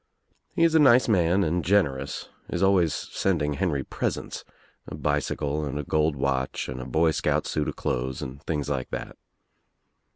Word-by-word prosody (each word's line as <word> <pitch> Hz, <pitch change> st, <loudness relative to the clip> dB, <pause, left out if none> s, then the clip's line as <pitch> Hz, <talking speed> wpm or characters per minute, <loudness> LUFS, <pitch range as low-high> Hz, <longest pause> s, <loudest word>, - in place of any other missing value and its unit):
He 165 Hz, -, +3 dB
is 165 Hz, -1 st, +4 dB
a 160 Hz, -, +6 dB
nice 130 Hz, -4 st, +6 dB
man 95 Hz, -2 st, +3 dB
and 85 Hz, +1 st, 0 dB
generous, 70 Hz, -9 st, 0 dB, 0.2 s
is 90 Hz, -, -1 dB
always 95 Hz, -4 st, +4 dB
sending 75 Hz, +3 st, -1 dB
Henry 75 Hz, -4 st, -1 dB
presents, -, -, -4 dB, 0.4 s
a -, -, -6 dB
bicycle 75 Hz, 0 st, -1 dB
and 70 Hz, -1 st, -3 dB
a 75 Hz, -, -2 dB
gold 75 Hz, +1 st, +1 dB
watch 65 Hz, -1 st, -1 dB
and 65 Hz, 0 st, -5 dB
a -, -, -6 dB
boy 80 Hz, +5 st, +2 dB
scout -, -, 0 dB
suit 75 Hz, -, -1 dB
of -, -, -3 dB
clothes 65 Hz, 0 st, -2 dB
and 65 Hz, +2 st, -7 dB
things 75 Hz, -3 st, -2 dB
like 70 Hz, -3 st, -2 dB
that. -, -, -6 dB
75 Hz, 170 wpm, -26 LUFS, 70-90 Hz, 0.4 s, a